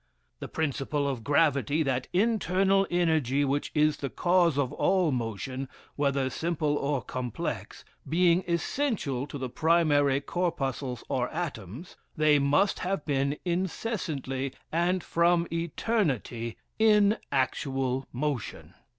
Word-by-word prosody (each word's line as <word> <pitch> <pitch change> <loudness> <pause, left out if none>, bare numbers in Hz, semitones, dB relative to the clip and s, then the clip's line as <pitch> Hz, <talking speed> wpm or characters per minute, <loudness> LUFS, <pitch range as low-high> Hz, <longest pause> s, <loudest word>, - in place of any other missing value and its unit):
"The - - -6
principle 145 -1 -1
of 130 -5 -3
gravity, 145 0 +2
that 130 -3 -1
internal 195 -1 +2
energy 155 -6 +2
which 140 +1 -1
is 150 -1 +3
the 140 - -4
cause 175 0 +2
of 140 -1 0
all 185 -1 +2
motion, 130 +2 -3 0.3
whether 140 -2 +1
simple 155 -1 -1
or 140 -2 -1
complex, 125 -3 -5 0.2
being 175 +2 +3
essential 170 - -1
to 145 - -6
the 130 -1 -3
primary 145 -2 +3
corpuscles 140 -7 -2
or 125 -1 -1
atoms, 145 - -6 0.2
they 155 -1 +4
must 145 +8 +2
have 185 -3 -2
been 140 0 0
incessantly 165 - -2 0.2
and 175 +2 +1
from 170 0 +2
eternity 155 - -1 0.2
in 210 -1 +5
actual 135 -1 -1
motion." 120 - -4
145 Hz, 115 wpm, -28 LUFS, 135-175 Hz, 0.3 s, in